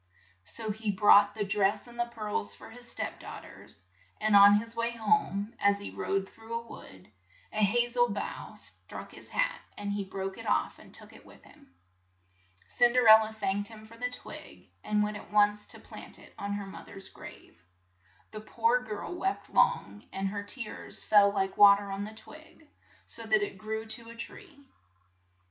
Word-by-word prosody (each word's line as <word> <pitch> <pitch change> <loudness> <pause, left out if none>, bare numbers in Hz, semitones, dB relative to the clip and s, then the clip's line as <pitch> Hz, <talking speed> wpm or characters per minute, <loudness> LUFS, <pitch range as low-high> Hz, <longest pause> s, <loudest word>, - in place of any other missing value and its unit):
So 210 - -3
he 215 +1 -4
brought 205 +1 +6
the 215 - -1
dress 195 0 +1
and 240 -1 -13
the 240 - +1
pearls 210 - -4
for 225 - -13
his 245 +1 -8
step - - -3
daugh - - -9
ters, 95 - -10 0.3
and 215 -1 +3
on 200 0 +9
his 230 +2 -2
way 230 +1 -1
home, 215 -1 0
as 200 0 +3
he 200 - -7
rode 195 0 -2
through 225 +2 -9
a 230 0 -4
wood, 95 - -13 0.4
a 215 - +1
ha 240 +4 +3
zel 240 0 +3
bough 200 -1 -5
struck - - -6
his - - -5
hat, - - 0 0.2
and 205 0 -3
he 205 0 -2
broke 190 0 -5
it - - -8
off - - 0
and - - -15
took - - -13
it - - -15
with - - -17
him. 90 - -20 0.9
Cin 240 -1 +4
der 250 -2 +4
el 220 0 +11
la 220 0 -3
thanked 205 -1 -1
him 220 -1 -11
for 225 +1 -14
the 245 +2 -2
twig, 250 - -11
and 210 0 +1
went 210 0 -2
at - - -12
once 210 0 +3
to - - -5
plant - - -11
it - - -16
on 200 0 -4
her 205 -1 -4
mother's 195 0 -9
grave. 85 - -13 0.7
The 215 - -7
poor 460 - +1
girl - - -6
wept 385 +2 -3
long, 210 - +2
and 195 0 -2
her 205 +1 -4
tears 215 +2 -5
fell 205 -1 +6
like 195 -1 -1
wa 200 -1 +9
ter 200 0 -6
on 195 +1 -3
the 215 +1 -9
twig, 310 +5 -13 0.4
so - - -5
that 390 +1 +3
it 405 - -5
grew 220 +1 -4
to 230 +1 -3
a 230 - -10
tree. 285 - -11
210 Hz, 195 wpm, -30 LUFS, 200-230 Hz, 0.9 s, el